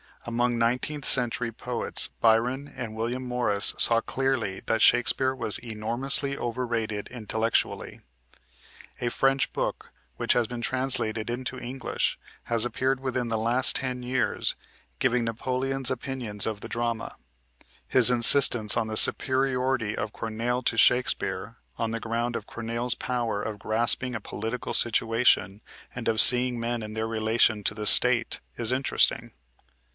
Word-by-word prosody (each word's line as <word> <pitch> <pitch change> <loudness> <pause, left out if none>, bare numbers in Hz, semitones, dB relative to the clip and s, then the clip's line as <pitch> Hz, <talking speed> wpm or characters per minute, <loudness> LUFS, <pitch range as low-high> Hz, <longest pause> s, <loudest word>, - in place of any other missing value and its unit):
Among 120 +1 -1
nineteenth 125 +5 -2
century 120 -2 -1
poets 115 - -1
Byron 125 +5 +1
and 115 -4 -7
William 120 +3 -4
Morris 125 -5 -1
saw 115 -1 +5
clearly 125 -7 -3
that 115 -1 -1
Shakespeare 130 +2 +3
was 105 -6 0
enormously 120 +5 -2
overrated 115 -3 -4
intellectually. 115 -1 -3 1.0
A 120 - -2
French 135 +2 0
book, - - -4 0.3
which - - +1
has 120 - +1
been 120 +1 -7
translated 120 -4 -1
into 130 +1 -5
English, 130 +1 -4 0.3
has 115 0 +1
appeared 130 +2 -2
within 130 -2 -3
the 110 - -1
last 115 +4 +2
ten 125 -1 -5
years, 125 +1 -1 0.4
giving 125 -1 0
Napoleon's 130 +3 -2
opinions 125 -5 -1
of 105 -2 -4
the - - -8
drama. 115 -1 -4 0.7
His 125 -1 +8
insistence 120 -2 +5
on 115 -1 -1
the 110 0 -3
superiority 130 -5 +2
of 105 - -5
Corneille 115 +3 -4
to 115 - -1
Shakespeare 125 +2 +1 0.2
on 115 -1 -3
the 115 - -4
ground 115 +1 -3
of - - -6
Corneille's 115 +1 -2
power 120 -5 -3
of 105 -1 -6
grasping 120 +4 +2
a - - -3
political 110 +4 -6
situation, 115 -3 +1 0.3
and 125 -2 -6
of 110 -1 +4
seeing 125 -1 +7
men 120 0 -3
in 105 0 -8
their 110 0 -3
relation 110 -1 0
to 105 - 0
the 105 -1 -3
state, 125 -2 +6 0.2
is 115 -1 -1
interesting. 130 +1 0
120 Hz, 140 wpm, -25 LUFS, 110-125 Hz, 1.0 s, His